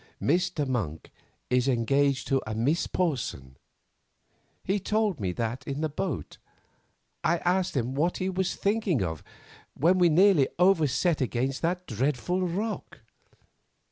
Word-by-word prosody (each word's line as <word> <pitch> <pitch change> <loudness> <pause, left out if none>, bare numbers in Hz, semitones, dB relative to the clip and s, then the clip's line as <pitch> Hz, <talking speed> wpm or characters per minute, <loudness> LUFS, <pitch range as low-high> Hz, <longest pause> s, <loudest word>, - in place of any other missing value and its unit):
"Mr. 170 -5 0
Monk 90 -12 -3 0.4
is 125 +1 +2
engaged 135 +2 +1
to 135 -1 +1
a 110 - -3
Miss 140 +10 +1
Porson. 125 - -2 1.1
He 195 +2 0
told 210 - 0
me 95 -3 -1
that 115 +4 -3
in 140 +2 -3
the 155 - 0
boat. 150 +1 -4 0.8
I 170 - +2
asked 180 -1 0
him 125 +1 -1
what 160 +6 0
he 185 - -2
was 190 0 -1
thinking 200 - 0
of 80 -4 -4 0.5
when 175 +6 +3
we 175 -1 +5
nearly 175 -3 +5
over 180 -3 +4
set 155 +5 +1
against 130 +2 -1
that 180 +2 -1
dreadful 135 - -1
rock. 210 +6 -4
150 Hz, 140 wpm, -27 LUFS, 125-180 Hz, 1.1 s, we